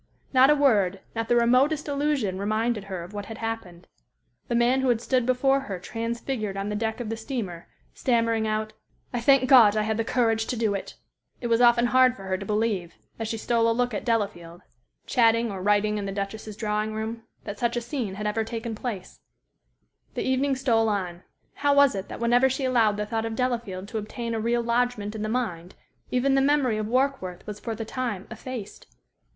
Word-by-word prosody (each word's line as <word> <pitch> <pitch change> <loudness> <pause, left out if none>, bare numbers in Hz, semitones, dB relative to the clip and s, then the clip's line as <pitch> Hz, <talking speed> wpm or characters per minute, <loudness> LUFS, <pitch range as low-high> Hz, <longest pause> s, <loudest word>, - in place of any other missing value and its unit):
Not 260 +1 +6
a 300 - +6
word, 205 -10 +3 0.2
not 225 0 -2
the 240 - +4
remotest 255 +6 +3
allusion 280 -9 0
reminded 215 +1 -1
her 190 -3 -5
of 180 +4 -11
what 205 -1 -6
had 225 - -7
happened. 205 -6 -5 0.6
The 235 - -1
man 245 +3 +3
who 265 - +1
had 235 -2 +3
stood 250 0 0
before 270 +2 +3
her 205 -9 -5
transfigured 225 +1 -4
on 195 +1 -3
the 210 - -2
deck 220 +2 -2
of 235 -3 -4
the 225 - -2
steamer, 220 -8 -5 0.3
stammering 230 -3 +1
out, 215 0 -2 0.4
"I 240 - -1
thank 265 +1 +4
God 225 -6 +7
I 215 - +2
had 220 0 -1
the 225 - +1
courage 225 -2 +1
to 250 - -2
do 220 -2 +1
it!" 195 - -5 0.4
it - - -7
was 230 0 +2
often 240 0 +5
hard 255 +1 +4
for 195 - -11
her 190 -1 -1
to 195 - -6
believe, 210 -5 -1 0.2
as 225 - -2
she 225 - -3
stole 230 +1 +1
a - - +3
look 245 -1 0
at 205 - -3
Delafield, 200 -7 -2 0.4
chatting 230 -2 +3
or 190 -2 -5
writing 210 +1 +2
in 200 - -4
the - - -3
Duchess's 205 +1 -5
drawing 215 0 -1
room, 220 +1 -4 0.2
that 205 - -7
such 235 0 0
a - - +2
scene 235 -5 -4
had 210 +1 -5
ever 210 +1 0
taken 230 0 -5
place. 210 -4 -6 1.0
The - - -1
evening 265 +1 +1
stole 230 -4 +2
on. 180 -4 -3 0.3
How 285 0 +1
was 280 -1 +6
it 195 -1 -5
that - - -8
whenever 240 +3 +4
she 265 +1 -2
allowed 230 -5 +3
the 210 - -2
thought 225 +1 -2
of 225 0 -3
Delafield 230 -7 -2
to 225 - -3
obtain 230 +2 -5
a 225 - -1
real 235 +2 0
lodgment 235 -3 0
in 220 - -5
the 215 - -2
mind, 190 -8 -3 0.3
even 260 +2 +2
the 270 - +4
memory 270 -6 +2
of 215 - -2
Warkworth 250 -8 -1
was 210 -1 -7
for 225 0 -4
the 225 +1 -5
time 225 -5 -3
effaced? 225 -3 -8
225 Hz, 210 wpm, -26 LUFS, 210-245 Hz, 1.0 s, God